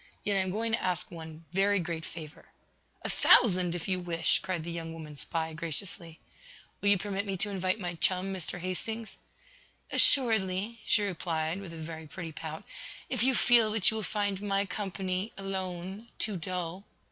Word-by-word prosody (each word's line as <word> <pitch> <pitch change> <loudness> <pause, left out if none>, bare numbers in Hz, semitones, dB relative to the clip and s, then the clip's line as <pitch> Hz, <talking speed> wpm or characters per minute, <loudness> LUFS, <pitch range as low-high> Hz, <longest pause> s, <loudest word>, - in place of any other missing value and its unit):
Yet 205 - +2
I - - +4
am 190 0 +1
going 225 +4 -1
to 230 - +2
ask 180 -1 -1
one 160 -1 -9
every 200 +1 +4
great 165 -2 -3
favor." 155 -2 -9 0.6
"A - - -1
thousand, 180 -6 +5
if 175 - -4
you 185 -1 +1
wish!" 170 -2 +1
cried 180 -4 -3
the 170 - -5
young 165 -1 -5
woman 155 -2 -8
spy, 160 +2 -2
graciously. 170 +1 -5 0.6
"Will 200 - +3
you 200 - +6
permit 200 +1 -3
me 195 -1 -1
to 205 +3 +1
invite 185 0 0
my 175 -3 -3
chum, 185 +3 +3
Mr. 180 -2 -3
Hastings?" 215 +5 -4 0.7
"Assuredly," 220 -3 +4
she 210 - +4
replied, 170 -2 -1
with 190 -4 -8
a 165 - -8
very 160 0 -7
pretty 165 +3 -6
pout, 160 0 -6 0.5
"if - - -1
you 260 +1 +4
feel 235 -3 +5
that 215 -1 +4
you - - -4
will - - -1
find 205 -2 -1
my 200 -1 +1
company, 190 0 -3
alone, 190 +2 -4
too 215 -2 0
dull." 180 +1 -4
185 Hz, 180 wpm, -30 LUFS, 165-200 Hz, 0.7 s, you